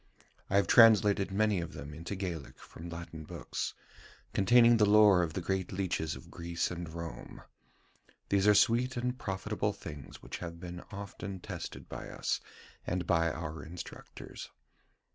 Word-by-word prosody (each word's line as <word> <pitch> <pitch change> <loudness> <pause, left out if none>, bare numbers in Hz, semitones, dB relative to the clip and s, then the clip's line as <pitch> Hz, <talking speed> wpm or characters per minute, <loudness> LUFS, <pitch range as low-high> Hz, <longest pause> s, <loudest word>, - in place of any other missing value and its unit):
I 100 - 0
have 100 - +5
translated 105 -4 +6
many 105 -1 +2
of 85 +1 -6
them 70 +1 -8
into 85 +6 -5
Gaelic 90 -6 -5
from 85 +2 -10
Latin 80 -1 -7
books, - - -4 0.6
containing 120 +3 +6
the 105 - +5
lore 105 -3 +7
of 80 -3 -1
the 95 - -2
great 95 +1 -1
leeches 90 -4 -1
of 65 - -12
Greece 85 0 -2
and 85 -2 -5
Rome. 85 -1 -8 0.9
These 100 0 +3
are 105 - +7
sweet 120 +5 +3
and 125 +1 -1
profitable 95 -1 -2
things 75 -2 -10
which - - -6
have 85 -1 -7
been 90 0 -7
often 100 -1 -6
tested - - -7
by - - -7
us - - -1 0.5
and 90 0 -1
by 85 -1 +2
our 80 0 -5
instructors. 85 +2 -9
90 Hz, 155 wpm, -32 LUFS, 85-100 Hz, 0.9 s, lore